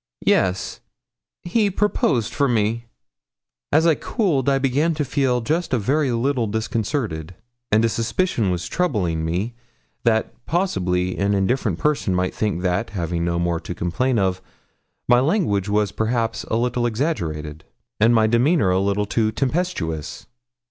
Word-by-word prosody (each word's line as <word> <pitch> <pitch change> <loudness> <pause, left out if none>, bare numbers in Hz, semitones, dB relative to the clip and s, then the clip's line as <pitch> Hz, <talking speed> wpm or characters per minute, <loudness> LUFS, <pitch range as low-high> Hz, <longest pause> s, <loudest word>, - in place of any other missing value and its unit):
'Yes; 95 0 +1 0.6
he 205 +4 +1
proposed 190 - 0
for 140 -1 +2
me.' 115 0 0 0.9
As 160 - +4
I 165 - +5
cooled, 155 - 0
I 135 - +3
began 140 +5 +1
to 150 -1 -1
feel 130 -2 +1
just 155 +3 0
a - - +2
very 135 +5 +1
little 120 0 0
disconcerted, 110 - -2 0.4
and 110 +1 +4
a - - +4
suspicion 115 - 0
was 90 -1 -2
troubling 95 - 0
me 90 +9 -2 0.5
that 110 -2 +1
possibly 90 - 0
an 100 +1 +2
indifferent 100 -1 0
person 140 -10 0
might 90 0 0
think 100 -5 -2
that, 90 -1 0
having 85 -3 -2
no 85 0 0
more 85 -1 0
to 85 +1 -7
complain 120 +10 0
of, 95 -2 0 0.7
my 120 0 +5
language 125 - +1
was 105 -1 +1
perhaps 115 +1 -1
a - - -2
little 120 +1 +1
exaggerated, 80 - -3 0.4
and 115 +3 +5
my 110 -1 +4
demeanour 120 - +3
a 90 - +2
little 100 +1 0
too 110 +1 0
tempestuous. 130 - -2
110 Hz, 150 wpm, -22 LUFS, 95-135 Hz, 0.9 s, I